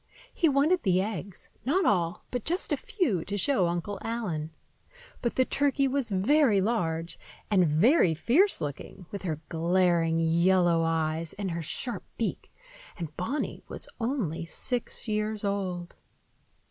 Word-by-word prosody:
He 330 Hz, -, +3 dB
wanted 300 Hz, +6 st, +3 dB
the 185 Hz, -2 st, +2 dB
eggs,—not 215 Hz, -, -2 dB
all, 175 Hz, -4 st, +1 dB
but 245 Hz, -3 st, -2 dB
just 350 Hz, +4 st, -1 dB
a -, -, +4 dB
few, 225 Hz, -, -1 dB
to 205 Hz, -, -2 dB
show 205 Hz, -5 st, +3 dB
Uncle 175 Hz, +4 st, -3 dB
Allen. 195 Hz, -10 st, -3 dB, 0.7 s
But 235 Hz, -, -1 dB
the 260 Hz, -, +3 dB
turkey 275 Hz, 0 st, +2 dB
was 270 Hz, -2 st, 0 dB
very 215 Hz, +3 st, +3 dB
large 170 Hz, -6 st, -1 dB, 0.3 s
and 185 Hz, -4 st, +4 dB
very 165 Hz, -, +4 dB
fierce 315 Hz, -, +3 dB
looking, 150 Hz, +5 st, -6 dB
with 200 Hz, -, -5 dB
her 155 Hz, -5 st, -3 dB
glaring, 170 Hz, -1 st, +2 dB
yellow 170 Hz, +1 st, +3 dB
eyes 160 Hz, 0 st, 0 dB
and 200 Hz, -3 st, -4 dB
her 170 Hz, 0 st, -3 dB
sharp 235 Hz, -, -4 dB
beak; -, -, -3 dB, 0.5 s
and 160 Hz, -3 st, -6 dB
Bonny 270 Hz, +12 st, -3 dB
was -, -, -4 dB
only 225 Hz, -, -1 dB
six 240 Hz, +9 st, -4 dB
years 215 Hz, 0 st, -1 dB
old. 185 Hz, -3 st, -3 dB
190 Hz, 140 wpm, -28 LUFS, 170-245 Hz, 0.7 s, a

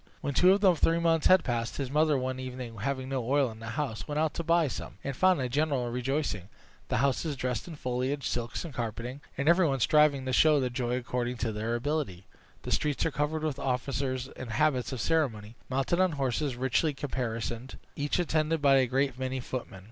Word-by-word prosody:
When 140 Hz, -, -2 dB
two 180 Hz, +6 st, +6 dB
of 200 Hz, +1 st, +3 dB
the 190 Hz, -3 st, +6 dB
three 165 Hz, +1 st, +2 dB
months 165 Hz, -2 st, +3 dB
were 185 Hz, -, +9 dB
passed, 120 Hz, -8 st, -3 dB
his 135 Hz, -2 st, -3 dB
mother 150 Hz, 0 st, +3 dB
one 130 Hz, 0 st, -2 dB
evening, 125 Hz, -2 st, -6 dB
having 130 Hz, +3 st, -2 dB
no 135 Hz, -2 st, -1 dB
oil 135 Hz, 0 st, +2 dB
in 110 Hz, -, -12 dB
the 115 Hz, -, -8 dB
house, 135 Hz, -8 st, -3 dB
went 150 Hz, -1 st, -3 dB
out 155 Hz, 0 st, +1 dB
to 170 Hz, -, -3 dB
buy 165 Hz, -1 st, +3 dB
some, -, -, -6 dB
and 140 Hz, -1 st, -3 dB
found 185 Hz, +3 st, +4 dB
a 130 Hz, -, 0 dB
general 135 Hz, -2 st, 0 dB
rejoicing 125 Hz, -, -2 dB, 0.4 s
the -, -, 0 dB
houses 140 Hz, +3 st, 0 dB
dressed 125 Hz, -1 st, -3 dB
with 165 Hz, -3 st, -8 dB
foliage, 130 Hz, +2 st, -2 dB
silks, 120 Hz, +7 st, -3 dB
and 160 Hz, -, -7 dB
carpeting, 120 Hz, +3 st, -4 dB, 0.2 s
and 140 Hz, +2 st, -1 dB
every 170 Hz, +1 st, +5 dB
one 135 Hz, -2 st, 0 dB
striving 145 Hz, 0 st, +4 dB
to 130 Hz, -, -2 dB
show 155 Hz, +2 st, +5 dB
their 130 Hz, -2 st, -1 dB
joy 125 Hz, -1 st, -1 dB
according 125 Hz, 0 st, -2 dB
to 115 Hz, 0 st, -1 dB
their 110 Hz, +2 st, -2 dB
ability. 120 Hz, -, -2 dB, 0.4 s
The -, -, -5 dB
streets 150 Hz, -2 st, +1 dB
were 165 Hz, -, +1 dB
crowded 150 Hz, +2 st, -1 dB
with 150 Hz, -3 st, -2 dB
officers 130 Hz, 0 st, -1 dB
in 130 Hz, -, -8 dB
habits 125 Hz, +3 st, +1 dB
of 130 Hz, -, -4 dB
ceremony, 115 Hz, -8 st, 0 dB
mounted 135 Hz, +7 st, 0 dB
on 185 Hz, -3 st, +3 dB
horses 135 Hz, 0 st, -1 dB
richly 130 Hz, +4 st, +1 dB
caparisoned, 120 Hz, -2 st, -4 dB, 0.2 s
each 145 Hz, 0 st, -1 dB
attended 160 Hz, -2 st, +1 dB
by 140 Hz, -2 st, +5 dB
a 130 Hz, -1 st, +3 dB
great 135 Hz, 0 st, 0 dB
many 130 Hz, 0 st, -2 dB
footmen. 125 Hz, -6 st, -6 dB
135 Hz, 210 wpm, -29 LUFS, 125-150 Hz, 0.4 s, were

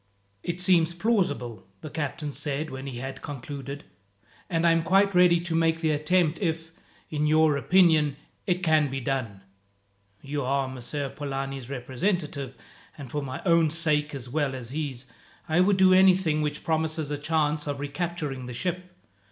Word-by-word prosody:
"It 175 Hz, -, -4 dB
seems 175 Hz, -2 st, +3 dB
plausible," 175 Hz, -, -1 dB
the 155 Hz, -, -7 dB
captain 150 Hz, -1 st, -3 dB
said 145 Hz, +2 st, -3 dB
when 130 Hz, +1 st, -6 dB
he 130 Hz, -3 st, -6 dB
had 135 Hz, +1 st, -6 dB
concluded, 140 Hz, 0 st, -7 dB, 0.7 s
"and 165 Hz, -1 st, +1 dB
I 170 Hz, -, +6 dB
am 165 Hz, 0 st, +3 dB
quite 195 Hz, +3 st, +3 dB
ready 180 Hz, -1 st, +5 dB
to 170 Hz, -1 st, -3 dB
make 165 Hz, 0 st, +2 dB
the 160 Hz, -2 st, +1 dB
attempt, 155 Hz, +2 st, +1 dB
if, 165 Hz, -3 st, -2 dB, 0.4 s
in 150 Hz, -1 st, 0 dB
your 155 Hz, -1 st, +4 dB
opinion, 155 Hz, -2 st, +4 dB, 0.3 s
it 180 Hz, 0 st, 0 dB
can 155 Hz, -3 st, +3 dB
be 135 Hz, +1 st, -3 dB
done. 120 Hz, -7 st, -3 dB, 0.8 s
You 145 Hz, +1 st, -3 dB
are 135 Hz, +1 st, 0 dB
Messer 130 Hz, +2 st, -4 dB
Polani's 135 Hz, -2 st, -5 dB
representative, 140 Hz, +1 st, -2 dB, 0.4 s
and 140 Hz, -5 st, -9 dB
for 145 Hz, -, -2 dB
my 130 Hz, -1 st, -6 dB
own 165 Hz, -3 st, +4 dB
sake 150 Hz, -2 st, 0 dB
as 130 Hz, -3 st, -6 dB
well 140 Hz, 0 st, -1 dB
as 125 Hz, -2 st, -8 dB
his, 140 Hz, -4 st, -4 dB, 0.4 s
I 160 Hz, +2 st, +2 dB
would 190 Hz, +1 st, +4 dB
do 185 Hz, -1 st, +6 dB
anything 185 Hz, -4 st, +4 dB
which 150 Hz, 0 st, -2 dB
promises 160 Hz, -2 st, -1 dB
a 145 Hz, -, -1 dB
chance 150 Hz, 0 st, 0 dB
of 140 Hz, -1 st, -3 dB
recapturing 145 Hz, -3 st, -3 dB
the 125 Hz, -, -6 dB
ship. 180 Hz, +6 st, -3 dB
150 Hz, 165 wpm, -26 LUFS, 135-170 Hz, 0.8 s, I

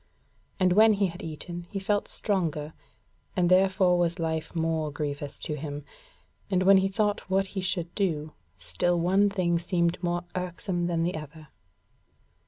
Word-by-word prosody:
And 185 Hz, -1 st, +4 dB
when 215 Hz, +2 st, +6 dB
he 200 Hz, -1 st, +2 dB
had 175 Hz, +1 st, -5 dB
eaten, 170 Hz, +2 st, -7 dB
he 205 Hz, -, -5 dB
felt 205 Hz, +1 st, 0 dB
stronger 160 Hz, -7 st, -1 dB, 0.6 s
and 180 Hz, -2 st, +2 dB
therefore 185 Hz, -1 st, +4 dB
was 170 Hz, -1 st, +1 dB
life 160 Hz, 0 st, -3 dB
more 160 Hz, -2 st, 0 dB
grievous 145 Hz, -1 st, -4 dB
to 150 Hz, -, -4 dB
him, 145 Hz, -1 st, -6 dB, 0.6 s
and 185 Hz, -2 st, +2 dB
when 195 Hz, +1 st, +7 dB
he 190 Hz, 0 st, +3 dB
thought 205 Hz, 0 st, -1 dB
what 195 Hz, +1 st, +2 dB
he 195 Hz, -, -2 dB
should 175 Hz, -2 st, -2 dB
do, 155 Hz, -6 st, -1 dB, 0.2 s
still 90 Hz, -, 0 dB
one 190 Hz, +4 st, +3 dB
thing 175 Hz, -4 st, +1 dB
seemed 170 Hz, 0 st, 0 dB
more 175 Hz, -1 st, -1 dB
irksome 180 Hz, 0 st, -2 dB
than 165 Hz, -1 st, 0 dB
the 175 Hz, +2 st, 0 dB
other. 155 Hz, 0 st, -9 dB
175 Hz, 160 wpm, -27 LUFS, 160-190 Hz, 0.6 s, when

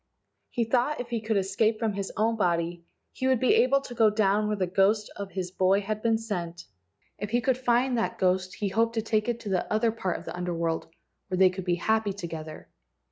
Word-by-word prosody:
He 240 Hz, -, 0 dB
thought 250 Hz, +6 st, +1 dB
if 245 Hz, -1 st, -5 dB
he 235 Hz, -2 st, -2 dB
could 220 Hz, -1 st, 0 dB
escape 200 Hz, +3 st, +1 dB
from 220 Hz, -1 st, -1 dB
his 200 Hz, -1 st, -4 dB
own 225 Hz, +2 st, +2 dB
body 170 Hz, -3 st, 0 dB, 0.3 s
he 260 Hz, -, -2 dB
would 260 Hz, -2 st, +3 dB
be 255 Hz, -, +4 dB
able 275 Hz, +2 st, +4 dB
to 260 Hz, -, -9 dB
go 225 Hz, -2 st, +4 dB
down 210 Hz, 0 st, +2 dB
where 210 Hz, -, 0 dB
the 190 Hz, -2 st, 0 dB
ghost 195 Hz, +4 st, +2 dB
of 200 Hz, -1 st, -6 dB
his 180 Hz, -2 st, -3 dB
boy 190 Hz, +1 st, +2 dB
had 215 Hz, +1 st, -3 dB
been 225 Hz, -1 st, +2 dB
sent. 175 Hz, -6 st, -5 dB, 0.5 s
If 205 Hz, -, -4 dB
he 240 Hz, +2 st, +2 dB
could 250 Hz, +2 st, +1 dB
find 250 Hz, 0 st, +2 dB
that -, -, -2 dB
ghost 185 Hz, 0 st, +1 dB
he 205 Hz, -, -2 dB
hoped 230 Hz, +4 st, +1 dB
to 225 Hz, -, 0 dB
take 215 Hz, +1 st, 0 dB
it 235 Hz, -1 st, -1 dB
to 210 Hz, -, -6 dB
the 185 Hz, -2 st, -1 dB
other 220 Hz, +1 st, +2 dB
part 190 Hz, -5 st, -2 dB
of -, -, -11 dB
the -, -, -6 dB
Under 180 Hz, -1 st, -3 dB
world, 165 Hz, -1 st, -1 dB, 0.4 s
where 185 Hz, -, -2 dB
they 185 Hz, -1 st, +6 dB
could 185 Hz, 0 st, -6 dB
be 175 Hz, -2 st, +2 dB
happy 220 Hz, +3 st, 0 dB
together. 160 Hz, -5 st, -7 dB
210 Hz, 235 wpm, -27 LUFS, 185-230 Hz, 0.5 s, they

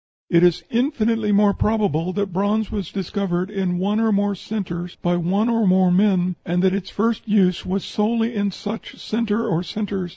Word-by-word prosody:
It 170 Hz, -1 st, +5 dB
is 175 Hz, -2 st, +3 dB
infinitely 230 Hz, -4 st, +1 dB
more 205 Hz, 0 st, +4 dB
probable 195 Hz, -7 st, 0 dB
that 200 Hz, -2 st, -2 dB
bronze 205 Hz, +3 st, 0 dB
was 200 Hz, -6 st, -4 dB
discovered 190 Hz, -1 st, -2 dB
in 190 Hz, -3 st, -1 dB
one 205 Hz, +4 st, 0 dB
or 225 Hz, -1 st, +2 dB
more 205 Hz, 0 st, +1 dB
centres 180 Hz, -3 st, -5 dB
by 175 Hz, 0 st, +1 dB
one 185 Hz, +6 st, +1 dB
or 230 Hz, -3 st, +2 dB
more 185 Hz, 0 st, +4 dB
men, 185 Hz, -2 st, +2 dB
and 175 Hz, 0 st, 0 dB
that 190 Hz, -1 st, +3 dB
its 195 Hz, -1 st, -3 dB
first 225 Hz, +2 st, -1 dB
use 190 Hz, -4 st, +2 dB
was 190 Hz, +1 st, -2 dB
solely 225 Hz, +2 st, 0 dB
in 205 Hz, -2 st, 0 dB
such 205 Hz, +3 st, -7 dB
centre 225 Hz, 0 st, -1 dB
or 170 Hz, -5 st, 0 dB
centres. 195 Hz, -1 st, -4 dB
200 Hz, 185 wpm, -21 LUFS, 180-215 Hz, -, It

